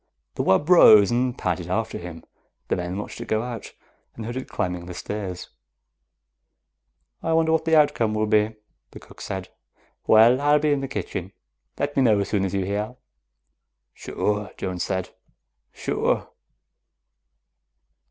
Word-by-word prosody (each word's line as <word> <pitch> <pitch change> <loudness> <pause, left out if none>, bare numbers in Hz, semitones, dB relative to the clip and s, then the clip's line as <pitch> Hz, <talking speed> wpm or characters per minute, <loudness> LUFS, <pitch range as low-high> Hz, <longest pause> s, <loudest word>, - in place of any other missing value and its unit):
The - - -2
wub 95 +11 +2
rose 110 - +7
and 125 +1 0
padded 90 -1 -2
after 110 +4 -2
him. 85 -2 -9 0.5
The - - +2
men 90 +1 -4
watched 105 - -7
it - - -7
go 110 +1 0
out. 120 -3 -7 0.5
They 115 - -6
heard 120 +2 -5
it 130 - -5
climbing 90 -3 -3
the 90 - -7
stairs. 95 -1 -5 1.7
"I 165 - -1
wonder 160 0 +3
what 160 0 +1
the 160 0 +3
outcome 145 -8 +2
will 110 0 +1
be," 105 0 +2 0.3
the - - -12
cook - - -16
said. 95 -1 -5 0.6
"Well, 115 +4 +6
I'll 145 +1 +4
be 150 0 +1
in 145 -1 +1
the 135 - -3
kitchen. - - -5 0.4
Let 145 0 -2
me 135 - +3
know 110 -5 +4
as 100 - -2
soon 100 -2 +1
as 95 - -4
you 95 -1 0
hear." 105 +5 -3 1.0
"Sure," 105 -1 -2
Jones 90 -2 -4
said. 95 -1 -2 0.6
"Sure." - - -1
110 Hz, 155 wpm, -24 LUFS, 95-130 Hz, 1.7 s, rose